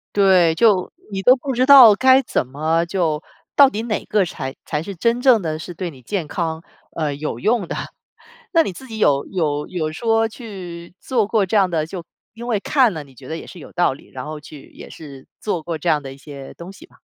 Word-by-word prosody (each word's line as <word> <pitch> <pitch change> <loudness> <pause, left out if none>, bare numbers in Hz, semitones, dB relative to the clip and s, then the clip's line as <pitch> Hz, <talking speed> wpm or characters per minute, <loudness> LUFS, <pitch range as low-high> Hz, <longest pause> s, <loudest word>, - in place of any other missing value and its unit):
对， 185 -5 +4
就 205 -4 +3 0.2
你 195 -1 -3
都 250 +5 +6
不 265 +1 -4
知 255 +2 +2
道 260 -6 +10
该 260 +2 +5
怎 230 - -2
么 160 +5 0
就 170 -4 -1 0.3
到 280 -2 +7
底 220 -3 -4
哪 225 -3 -2
个 205 -3 +1
才 135 -5 -6
才 150 -1 -2
是 195 +2 -7
真 235 +7 0
正 250 -6 +5
的 155 -2 -3
是 175 +2 -8
对 175 +1 -4
你 130 - -15
健 170 - -3
康， 165 0 -3 0.3
呃， 150 -3 -1
有 145 -5 -5
用 215 - +1
的。 - - -4 0.8
那 330 -1 +5
你 190 - -4
自 265 - -12
己 220 -2 -7
有 140 -6 +2
有 150 -5 -2
有 155 -4 -3
说 225 +3 +1
去 185 -7 -9
做 230 -6 0
过 210 -3 +2
这 200 - -3
样 195 -2 +3
的 160 -3 -1
就 175 +1 -7 0.3
因 235 +2 -9
为 220 -5 0
看 255 -1 +3
了 155 -3 -6
你 135 -2 -19
觉 - - -13
得 160 - -4
也 - - -9
是 180 - -11
有 - - -12
道 175 -5 +2
理， 135 - -16
然 130 -1 -7
后 155 0 -6
去 150 -1 -13
也 - - -11
是 140 -4 -12
做 185 -6 -2
过 165 -1 -4
这 170 +3 -2
样 150 -2 +2
的 135 -1 -7
一 - - -15
些 140 -1 -10
东 170 +2 -10
西 305 +12 -14
吧。 - - -25
175 Hz, 255 characters per minute, -20 LUFS, 155-220 Hz, 0.8 s, 道